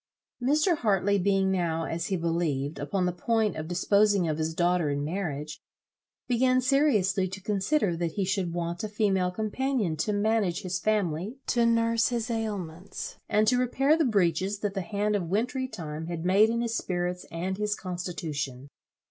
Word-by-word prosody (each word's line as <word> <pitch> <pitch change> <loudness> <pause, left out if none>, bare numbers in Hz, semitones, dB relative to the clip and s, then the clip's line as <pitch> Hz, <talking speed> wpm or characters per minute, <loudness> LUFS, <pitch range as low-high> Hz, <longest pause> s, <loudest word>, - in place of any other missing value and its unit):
Mr. 305 +7 +3
Hartley 200 -4 +2
being 195 0 +2
now, 170 -3 0
as 165 +1 -3
he 190 - 0
believed, 165 -4 -1
upon 180 +6 -1
the 180 - +1
point 215 +3 0
of 155 0 -5
disposing 200 +1 +3
of 155 0 -1
his 160 +1 -2
daughter 175 -2 +2
in 145 0 -1
marriage, 155 -4 -4 0.7
began 255 +1 +3
seriously 235 -9 +2
to 190 +1 -7
consider 200 - 0
that 165 -1 -2
he 200 - -1
should 190 -2 -1
want 170 +1 -3
a 215 - -3
female 195 -3 +1
companion 220 -1 -1
to 155 +8 -1
manage, 205 -3 +1
his 180 0 -2
family, 205 - -1
to 235 -1 +2
nurse 230 0 +3
his 240 -1 -2
ailments, 200 -6 -4
and 215 +1 +3
to 250 +2 +4
repair 270 +4 +3
the 325 - +2
breaches, 195 - +1
that 205 -2 -1
the 195 - -2
hand 210 +2 -1
of 175 -5 -2
wintry 250 +7 0
time 160 -8 -6
had 170 -1 -4
made 200 +4 +5
in 235 +1 0
his 230 -1 -1
spirits 180 -2 -2
and 185 +4 -3
his 210 0 0
constitution. 155 -7 -5
195 Hz, 175 wpm, -28 LUFS, 170-220 Hz, 0.7 s, made